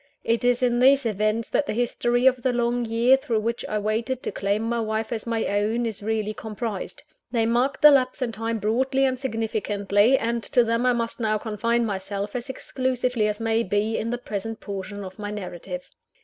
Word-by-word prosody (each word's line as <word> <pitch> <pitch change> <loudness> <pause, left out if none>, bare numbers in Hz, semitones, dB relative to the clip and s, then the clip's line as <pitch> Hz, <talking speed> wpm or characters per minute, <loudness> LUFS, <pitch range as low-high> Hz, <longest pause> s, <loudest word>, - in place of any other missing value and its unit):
It 230 +1 0
is 245 0 +2
in 240 -1 +2
these 270 +1 +5
events 215 +1 0
that 290 - +1
the - - -2
history 245 +1 +1
of 255 -1 +4
the 255 - +1
long 240 0 0
year 230 +4 +4
through 230 -5 -1
which 230 +2 -2
I 215 - 0
waited 220 +4 -1
to - - -2
claim 200 +2 -1
my 235 +1 -1
wife 220 0 -2
as 225 0 -5
my 230 -1 0
own, 215 +4 0
is 220 -3 -4
really 215 0 -1
comprised. 215 -1 -5 0.3
They 230 -2 +2
marked 245 +5 +1
the 300 - +11
lapse 255 -2 +2
of 240 - -2
time 225 +1 -2
broadly 260 +6 +1
and 255 -1 0
significantly; 215 -2 +1
and 235 0 -1
to 245 +1 +4
them 230 +2 +1
I 250 - +4
must 230 0 -3
now 215 -2 +1
confine 230 +2 0
myself, 200 0 -4
as 245 +2 -4
exclusively 255 -3 -1
as 210 0 -2
may 225 0 +1
be, 210 +2 0
in 230 - -2
the 245 - -1
present 225 -1 -5
portion 200 0 -6
of 190 +1 -10
my 205 0 -4
narrative. 180 -3 -6
230 Hz, 205 wpm, -24 LUFS, 210-245 Hz, 0.3 s, the